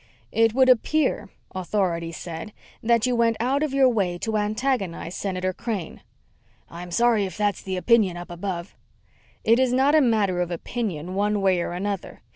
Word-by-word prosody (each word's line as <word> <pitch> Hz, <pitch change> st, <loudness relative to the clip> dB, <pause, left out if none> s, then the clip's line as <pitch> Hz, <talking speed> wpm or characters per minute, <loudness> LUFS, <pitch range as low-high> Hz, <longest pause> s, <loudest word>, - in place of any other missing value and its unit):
"It 225 Hz, 0 st, +2 dB
would 260 Hz, 0 st, +5 dB
appear," 260 Hz, +1 st, +2 dB, 0.2 s
Authority 180 Hz, -3 st, -1 dB
said, 170 Hz, +4 st, -7 dB, 0.3 s
"that 235 Hz, 0 st, +2 dB
you 250 Hz, -1 st, +1 dB
went 230 Hz, -1 st, +2 dB
out 260 Hz, +5 st, +1 dB
of 305 Hz, -2 st, 0 dB
your 270 Hz, -1 st, +4 dB
way 195 Hz, -8 st, 0 dB
to 220 Hz, +4 st, -3 dB
antagonize 210 Hz, -5 st, -1 dB
Senator 185 Hz, -1 st, -2 dB
Crane." 205 Hz, -5 st, -5 dB, 0.7 s
"I'm 175 Hz, +1 st, -8 dB
sorry 225 Hz, +2 st, +3 dB
if 185 Hz, -, -7 dB
that's 205 Hz, -1 st, 0 dB
the 190 Hz, -1 st, -4 dB
opinion 200 Hz, -3 st, +3 dB
up 175 Hz, 0 st, -8 dB
above." 175 Hz, 0 st, -5 dB, 0.7 s
"It 230 Hz, +2 st, +4 dB
is 260 Hz, -2 st, +3 dB
not 265 Hz, +3 st, +3 dB
a 310 Hz, -, +6 dB
matter 210 Hz, -8 st, +2 dB
of 175 Hz, -, -1 dB
opinion, 180 Hz, -2 st, -4 dB
one 205 Hz, +1 st, +1 dB
way 190 Hz, -3 st, +2 dB
or 170 Hz, -, -3 dB
another. 195 Hz, +1 st, -4 dB
205 Hz, 170 wpm, -24 LUFS, 180-235 Hz, 0.7 s, a